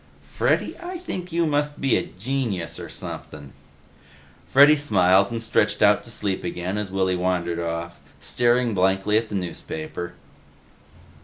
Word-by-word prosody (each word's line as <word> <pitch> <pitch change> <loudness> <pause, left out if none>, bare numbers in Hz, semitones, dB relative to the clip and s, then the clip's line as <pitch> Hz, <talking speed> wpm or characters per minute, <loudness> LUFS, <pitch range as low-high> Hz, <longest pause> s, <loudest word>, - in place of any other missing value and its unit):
"Freddy, - - 0
I 355 +1 -5
think 185 - -6
you 170 0 +1
must 145 -1 0
be 135 -2 +2
a - - +2
genius 105 -2 -3
or - - -7
sumpin'." 70 -2 -8 0.9
Freddy 145 +3 +7
smiled 100 -8 +3
and 115 -1 -3
stretched 110 -2 +2
out 105 0 +5
to - - -9
sleep 100 -4 -2
again 90 +3 -3
as 105 -2 -4
Willy 95 -1 +1
wandered 90 -2 -1
off, 85 0 -4 0.2
staring 120 -1 +1
blankly 95 +2 +2
at 115 -1 -7
the - - -4
newspaper. 85 -1 -5
100 Hz, 145 wpm, -24 LUFS, 90-125 Hz, 0.9 s, Freddy